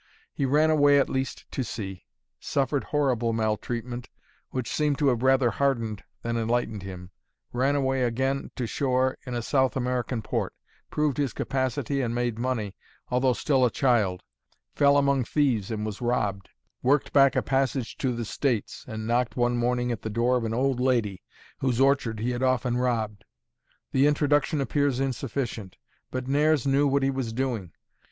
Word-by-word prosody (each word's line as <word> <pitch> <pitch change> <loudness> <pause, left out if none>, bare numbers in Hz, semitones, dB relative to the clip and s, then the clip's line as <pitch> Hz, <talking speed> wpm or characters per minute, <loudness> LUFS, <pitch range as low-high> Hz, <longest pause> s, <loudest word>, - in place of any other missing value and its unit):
He 140 - -1
ran 155 +4 +4
away 145 -2 +5
at 140 - +2
least 130 0 -3
to 130 - -2
sea; 100 -4 -6 0.3
suffered 140 0 -1
horrible 125 -6 +1
maltreatment, 115 +2 -2 0.4
which 130 -3 -3
seemed 150 -2 0
to 145 -2 +3
have 120 -3 0
rather 130 -2 +4
hardened 115 -5 -1 0.2
than 115 0 -1
enlightened 115 -2 -1
him; 90 -1 -8 0.4
ran 135 +3 +2
away 135 -2 +1
again 130 +3 0
to 125 - -2
shore 130 +1 +1
in 125 - -3
a 120 - -2
South 130 +1 +1
American 125 -2 -1
port; - - -2 0.3
proved 150 -3 0
his 140 -5 0
capacity 135 +1 -1
and 120 -2 -1
made 120 -2 -1
money, 115 -5 -2 0.4
although 125 +1 +3
still 135 0 +1
a 125 - +5
child; 115 -10 +1 0.5
fell 140 0 +4
among 140 -2 +3
thieves 120 -6 +1
and 110 -2 -3
was 110 +1 -5
robbed; 105 -5 -1 0.3
worked 140 +3 +2
back 140 -1 +5
a - - +2
passage 135 -2 0
to 130 - 0
the 120 -1 -3
States, 120 -1 -2
and 110 0 -5
knocked 120 +2 0
one 120 0 +2
morning 120 0 0
at 115 - -4
the 110 - -4
door 120 +4 +2
of 120 -2 0
an 110 - -2
old 130 0 +1
lady 120 -7 +1 0.4
whose 130 -3 0
orchard 135 -5 +2
he 120 +3 -1
had 120 0 -3
often 130 -1 +1
robbed. 115 -4 -1 0.7
The 135 +2 +4
introduction 145 0 +2
appears 140 -1 +1
insufficient; 125 -6 -3 0.3
but 130 0 -4
Nares 145 0 +2
knew 140 +1 +3
what 140 0 +2
he 135 - +2
was 130 -4 -3
doing. 115 -8 -2
125 Hz, 170 wpm, -26 LUFS, 115-135 Hz, 0.7 s, away